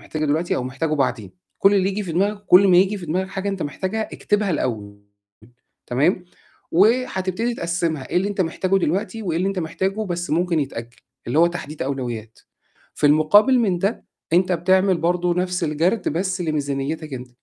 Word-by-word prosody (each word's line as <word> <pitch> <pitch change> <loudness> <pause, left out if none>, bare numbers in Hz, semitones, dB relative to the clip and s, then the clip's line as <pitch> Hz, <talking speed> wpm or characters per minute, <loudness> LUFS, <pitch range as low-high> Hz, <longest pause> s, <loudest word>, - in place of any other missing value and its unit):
محتاجه 155 0 -4
الوقتي 155 +4 0
أو - - -2
محتاجه 155 +5 -2
بعدين، 115 -9 -1 0.3
كل 200 +1 +5
اللي 190 -1 +2
ييجي 205 +2 -2
في 170 -4 -5
دماغك 200 +4 0
وكل 190 +1 +6
ما 180 - +6
ييجي 195 +3 +3
في 175 - -8
دماغك 185 +4 -1
حاجة 195 +1 -4
أنت 195 -3 -3
محتاجها 190 +9 -3
اكتبها 210 -1 0
الأول 105 - -3 0.8
تمام، 155 +9 +1 0.5
وهتبتدي 215 +1 +1
تقسّمها 170 - -2
إيه - - -1
اللي 195 +3 +2
أنت 205 -2 -3
محتاجه 185 +3 0
دلوقتي 195 +6 -2
وإيه 170 -4 -1
اللي 190 +2 0
أنت 195 -1 -3
محتاجه 190 +6 -2
بس 175 0 -4
ممكن 170 0 +1
يتأجّل، 120 -4 -6 0.3
اللي 125 +6 0
هو 170 - +6
تحديد 155 -3 -6
أولويات. 120 -5 -5 0.6
في 145 - +1
المقابل 205 - +5
من 195 -7 +1
ده 200 +6 -2 0.3
أنت 180 +1 +3
بتعمل 185 +2 +3
برضه 175 +1 +1
نَفْس 180 0 -1
الجَرد 170 +7 0
بس 185 +3 -2
لميزانيتك 150 -1 -3
أنت، 125 0 -8
175 Hz, 175 wpm, -22 LUFS, 150-195 Hz, 0.8 s, وكل